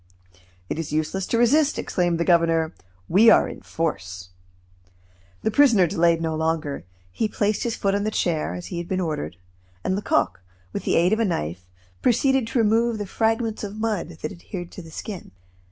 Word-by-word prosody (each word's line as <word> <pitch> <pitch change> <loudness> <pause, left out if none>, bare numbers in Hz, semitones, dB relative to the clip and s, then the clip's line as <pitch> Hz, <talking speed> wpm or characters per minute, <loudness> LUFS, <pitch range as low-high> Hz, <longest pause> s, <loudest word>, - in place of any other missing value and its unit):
"It 155 - -3
is 165 - -4
useless 155 +5 -1
to 230 - +1
resist," 285 +6 +4
exclaimed 175 -2 0
the 170 - +1
governor, 165 -2 +3 0.3
"we 215 +6 +6
are - - +6
in - - -8
force." 90 - -4 1.1
The 220 - +1
prisoner 230 -6 +5
delayed 165 0 +2
no 160 -1 -1
longer. 160 -4 -1 0.3
He 215 - 0
placed 210 0 0
his 235 -2 -1
foot 195 -1 0
on 200 0 0
the 215 - 0
chair, 170 -7 -1
as 180 - -7
he 170 - -2
had 170 - -5
been 185 0 -1
ordered, 120 - -3 0.5
and 185 - 0
Lecoq, 200 - 0 0.3
with - - -4
the - - +2
aid 175 +4 +4
of 220 - +1
a 230 - +3
knife, 90 - -3 0.3
proceeded 260 0 +3
to 240 - -2
remove 230 +1 +3
the 205 - -3
fragments 225 +2 0
of 205 0 -5
mud 210 -7 -2
that 155 - -2
adhered 175 0 -8
to - - -9
the 165 - -12
skin. 190 +4 -7
185 Hz, 185 wpm, -24 LUFS, 165-220 Hz, 1.1 s, we